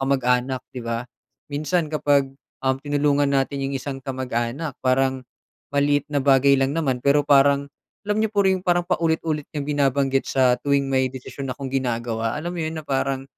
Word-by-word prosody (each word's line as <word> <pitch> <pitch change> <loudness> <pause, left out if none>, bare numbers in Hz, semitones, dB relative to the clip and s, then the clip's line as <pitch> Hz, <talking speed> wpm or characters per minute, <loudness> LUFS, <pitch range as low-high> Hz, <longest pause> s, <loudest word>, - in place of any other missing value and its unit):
kamag-anak 130 -1 +1
'di 125 - -6
ba, 115 +1 -2 0.5
minsan 155 +3 0
kapag, 140 -3 +2 0.3
uhm, 130 0 +2
tinulungan 145 -1 +2
natin 135 0 0
yung 135 - -2
isang 135 0 -5
kamag-anak 130 +2 -3
parang 130 0 +1 0.5
maliit 145 0 +2
na 145 - +2
bagay 140 0 +5
lang 135 +3 0
naman 135 -6 0
pero 145 +1 +3
parang 140 0 +4 0.4
alam 210 - 0
n'yo 220 - 0
po 210 - -4
yon 190 -1 +2
parang 175 -1 +1
paulit-ulit 160 -3 0
niyang 145 -3 -4
binabanggit 135 -2 +1
sa 130 -2 +3
tuwing 140 -1 +1
may 130 -1 +2
desisyon 135 +1 -7
akong 135 +1 -5
ginagawa. 120 -2 -1
Alam 175 +3 -4
mo - - -3
yon 160 +1 -4
na - - -16
parang, 135 0 -1
140 Hz, 170 wpm, -23 LUFS, 130-145 Hz, 0.5 s, bagay